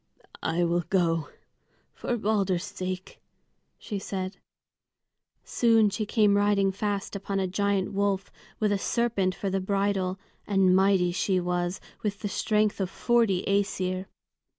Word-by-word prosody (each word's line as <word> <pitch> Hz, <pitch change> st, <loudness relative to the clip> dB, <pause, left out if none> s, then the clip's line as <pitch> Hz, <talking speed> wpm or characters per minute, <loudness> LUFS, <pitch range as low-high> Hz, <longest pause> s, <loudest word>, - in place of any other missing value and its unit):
"I 170 Hz, +2 st, 0 dB
will 170 Hz, 0 st, +2 dB
go, 165 Hz, -5 st, +1 dB, 0.6 s
for 240 Hz, -, -2 dB
Balder's 200 Hz, -5 st, +1 dB
sake," 185 Hz, 0 st, -6 dB, 0.6 s
she 205 Hz, -3 st, -5 dB
said. 190 Hz, 0 st, -4 dB, 1.1 s
Soon 225 Hz, -3 st, +3 dB
she 215 Hz, +1 st, -2 dB
came 210 Hz, -3 st, +3 dB
riding 200 Hz, -1 st, +3 dB
fast 200 Hz, +1 st, -3 dB
upon 195 Hz, 0 st, -2 dB
a 190 Hz, -, +1 dB
giant 200 Hz, +1 st, 0 dB
wolf, 200 Hz, -1 st, 0 dB, 0.3 s
with 215 Hz, -1 st, +2 dB
a 200 Hz, -, +1 dB
serpent 200 Hz, -5 st, 0 dB
for 195 Hz, -, -3 dB
the 195 Hz, 0 st, 0 dB
bridle; 195 Hz, -1 st, 0 dB, 0.3 s
and 195 Hz, -2 st, +4 dB
mighty 190 Hz, -2 st, +3 dB
she 185 Hz, +1 st, +1 dB
was, 175 Hz, +1 st, -1 dB, 0.2 s
with 205 Hz, -1 st, -3 dB
the 205 Hz, -, -2 dB
strength 210 Hz, 0 st, +1 dB
of 185 Hz, -, -1 dB
forty 225 Hz, -5 st, +2 dB
Æsir. 190 Hz, -2 st, 0 dB
195 Hz, 135 wpm, -27 LUFS, 185-205 Hz, 1.1 s, and